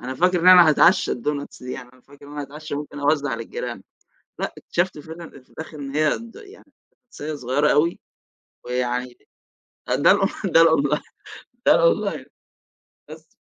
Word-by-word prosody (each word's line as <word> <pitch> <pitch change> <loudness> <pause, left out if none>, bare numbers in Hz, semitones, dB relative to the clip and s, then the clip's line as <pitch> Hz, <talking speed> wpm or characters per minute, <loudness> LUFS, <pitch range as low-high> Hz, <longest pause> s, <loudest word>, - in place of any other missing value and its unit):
أنا 130 +1 -5
فاكر 180 +3 +2
إن 180 - +4
أنا 180 -3 +9
هاتعشى 170 +4 +4
الدونتس 140 +2 -5
دي 125 - -6
يعني 125 -2 -9
أنا 130 - -22
فاكر 145 +2 -17
إن 145 - -12
أنا 150 - -5
هاتعشى 150 +2 -8
وممكن 145 0 -6
أوزع 145 -3 +1
للجيران، 115 -1 -6 0.6
لأ، - - -3
اكتشفت 175 -3 -2
فعلًا 160 +2 -10
في - - -31
الآخر 160 -1 -10
إن 135 -1 -6
هي 155 0 +3
ض 230 0 -12
يعني 425 0 -16 0.4
ص 145 - -11
صغيّرة 145 -1 0
أوي، 165 +4 +2 0.7
ويعني 125 0 -3 0.7
ده - - +3
الأون - - +2 0.2
ده 165 - +5
الأونلا 150 -3 +3 0.7
ده - - +7
الأونلاين. - - +1 0.8
بس. - - -13
150 Hz, 160 wpm, -22 LUFS, 135-165 Hz, 0.8 s, أنا